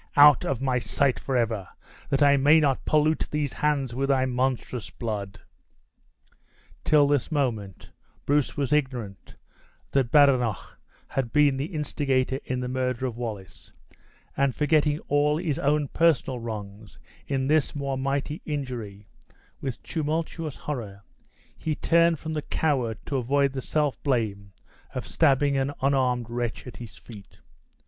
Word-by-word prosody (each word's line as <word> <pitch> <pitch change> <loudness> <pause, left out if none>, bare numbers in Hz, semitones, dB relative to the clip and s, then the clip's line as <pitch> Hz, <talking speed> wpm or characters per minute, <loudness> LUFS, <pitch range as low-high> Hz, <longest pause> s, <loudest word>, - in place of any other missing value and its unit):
"Out 145 -2 +8
of 135 -1 -2
my 130 -2 +1
sight 125 +5 +1
forever, 115 -7 -1 0.4
that 140 0 +2
I 140 0 +6
may 145 +4 +5
not 140 -4 +1
pollute 155 +1 +2
these 150 -3 -2
hands 140 -5 0
with 135 +3 -1
thy 130 -1 +3
monstrous 125 -2 -2
blood!" 105 -4 -5 1.4
Till 150 -2 +4
this 145 -1 0
moment 110 - -2 0.3
Bruce 145 0 +1
was 145 0 0
ignorant 125 - -2 0.6
that 135 -4 +1
Badenoch 130 -8 +3 0.3
had 130 -4 -2
been 145 -2 +4
the 135 - -1
instigator 135 -3 0
in 125 0 -2
the 125 - -3
murder 125 0 -1
of 125 -3 -3
Wallace; 105 -8 -7 0.6
and 140 -2 +1
forgetting 150 -1 +2
all 145 +1 +1
his 160 -4 -2
own 145 +1 +1
person 165 -5 +2
wrongs 105 -6 -7 0.3
in 135 -2 -1
this 155 +1 +1
more 140 -1 -2
mighty 140 +3 -2
injury, 120 -9 -5 0.6
with 130 -3 -5
tumultuous 160 -1 -3
horror, 105 -9 -6 0.5
he 155 -1 -3
turned 170 +1 +3
from 160 +2 -5
the 150 - -2
coward 130 -8 -1
to 140 - -2
avoid 135 +2 +1
the 135 - -3
self 150 0 -1
blame 105 -7 -1 0.4
of - - -3
stabbing 140 -2 +2
an 135 +1 0
unarmed 130 -3 +1
wretch 120 0 -3
at 125 - -9
his 120 -3 -10
feet. 105 -4 -13
135 Hz, 140 wpm, -26 LUFS, 120-145 Hz, 1.4 s, Out